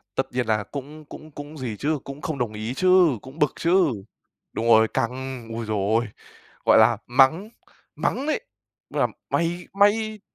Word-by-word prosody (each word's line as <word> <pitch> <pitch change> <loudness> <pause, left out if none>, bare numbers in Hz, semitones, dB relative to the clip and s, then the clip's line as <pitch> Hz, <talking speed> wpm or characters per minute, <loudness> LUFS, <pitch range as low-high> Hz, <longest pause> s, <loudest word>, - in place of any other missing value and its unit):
Tất 135 - -2
nhiên 125 -1 -1
là 105 -2 0
cũng 145 +5 -8
cũng 155 +1 -12
cũng 145 +1 -9
gì 120 -5 -4
chứ, 150 +6 -1
cũng 140 +2 -8
không 150 -1 -4
đồng 120 -3 -2
ý 110 +3 -4
chứ, 185 +2 +5
cũng 130 +4 -12
bực 150 -3 +2
chứ. 175 +1 +3 0.7
Đúng 115 - -3
rồi, 110 -1 +6
căng! 125 0 -3
Ôi 115 0 -4
giời 110 0 -1 0.2
ơi! 120 - -5 0.6
Gọi - - +6
là - - +5
mắng, 135 - +3 0.5
mắng 275 - -1
đấy, 310 - 0 0.5
là - - +1 0.2
"mày 170 +1 -1
mày" 210 +2 +2
140 Hz, 175 wpm, -24 LUFS, 120-170 Hz, 0.7 s, rồi